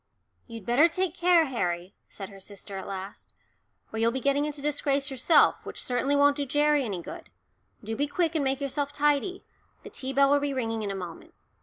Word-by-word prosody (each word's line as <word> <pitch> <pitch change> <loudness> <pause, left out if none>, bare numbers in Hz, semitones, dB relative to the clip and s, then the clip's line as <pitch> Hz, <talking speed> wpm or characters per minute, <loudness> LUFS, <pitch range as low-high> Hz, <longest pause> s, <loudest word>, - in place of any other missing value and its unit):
"You'd 230 -4 -9
better 250 +9 +5
take 365 0 -1
care, 350 -2 +4
Harry," 180 - -2
said 195 -2 -8
her 195 -1 -13
sister 200 0 -9
at 190 - -6
last, 195 0 -8 0.6
"or 220 - -3
you'll 230 +1 +3
be 265 - -2
getting 280 +2 +1
into 300 -1 -4
disgrace 280 -1 0
yourself, 265 +5 +4
which - - -7
certainly 255 +3 +1
won't 285 0 +4
do 290 - -1
Gerry 295 0 +2
any 195 -7 -4
good. - - -9 0.5
Do 220 +2 -4
be 285 +4 0
quick 330 +2 0
and 310 -3 0
make 270 +1 0
yourself 280 +1 -2
tidy, 295 +6 0 0.4
the - - -10
tea 265 0 -4
bell 275 +1 +4
will 285 - +5
be 285 -1 -2
ringing 225 -3 -2
in 205 - -3
a 195 - -3
moment. 175 -3 -8
275 Hz, 205 wpm, -27 LUFS, 220-290 Hz, 0.6 s, better